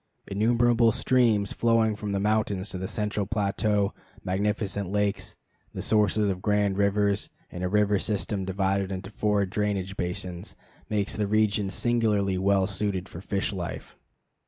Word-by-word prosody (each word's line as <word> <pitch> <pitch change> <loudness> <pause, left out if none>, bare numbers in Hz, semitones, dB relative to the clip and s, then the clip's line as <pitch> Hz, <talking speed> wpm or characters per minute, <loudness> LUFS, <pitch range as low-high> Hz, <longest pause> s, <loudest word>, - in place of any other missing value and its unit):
Innumerable 115 +3 +3
streams 110 -5 +2
flowing 115 -2 +2
from 105 0 -4
the 100 - 0
mountains 105 -1 0
to 95 - -4
the 95 - -3
central 105 -1 -2
plateau, 105 -1 0 0.3
magnificent 100 0 -1
lakes, 105 0 -1 0.4
the - - -3
sources 105 -1 +2
of 95 -2 -2
grand 105 -1 +1
rivers, 100 0 +1 0.2
and 90 - -5
a 90 - 0
river 105 0 +3
system 100 -1 -1
divided 95 0 0
into 95 +1 -5
four 105 -1 +1
drainage 100 -1 -2
basins, 90 0 -4 0.3
make 105 -2 0
the 105 -1 -1
region 105 -1 +2
singularly 105 -4 +1
well 95 0 +3
suited 95 -2 -2
for 85 - -9
fish 100 +1 -2
life. 90 -3 -6
100 Hz, 145 wpm, -27 LUFS, 95-105 Hz, 0.4 s, Innumerable